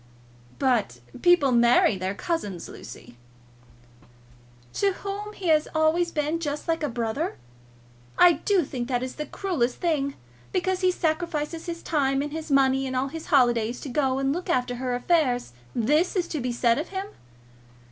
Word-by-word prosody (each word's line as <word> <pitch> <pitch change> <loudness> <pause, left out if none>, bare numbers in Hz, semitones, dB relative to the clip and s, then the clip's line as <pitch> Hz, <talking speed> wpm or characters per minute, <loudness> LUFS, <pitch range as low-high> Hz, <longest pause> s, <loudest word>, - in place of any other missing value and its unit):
"But 230 - +1 0.2
people 350 -6 +5
marry 235 -3 +5
their 190 +1 -3
cousins, 205 - -3
Lucy." 120 - -11 1.6
"To 400 -1 +1
whom 405 +2 -6
he 370 -4 -3
has 310 -1 +4
always 320 +2 +2
been 305 +2 -1
just 295 -1 -4
like 330 0 0
a 295 - -1
brother! 235 +8 -2 0.8
I 355 - +8
do 380 +1 +1
think 245 -3 -4
that 250 -1 -1
is 255 - -4
the 300 -1 -4
cruellest 280 -12 -1
thing. 285 -5 0 0.4
Because 370 +1 0
he 370 - +4
sacrifices 330 -1 -2
his 335 -1 -5
time 275 -3 +1
and 295 - -5
his 315 +1 -6
money 270 -1 +3
and 260 - -4
all 260 +2 0
his 325 +2 -8
holidays 240 -4 +3
to 280 - -6
go 265 0 +1
and 270 0 +1
look 355 +3 -5
after 245 -1 0
her 250 0 -2
affairs, 250 - +1 0.2
this 300 - +2
is 360 -2 0
to 310 - -3
be 250 0 -1
said 235 +1 +2
of 310 - -3
him! 385 0 -4
290 Hz, 165 wpm, -25 LUFS, 250-335 Hz, 1.6 s, I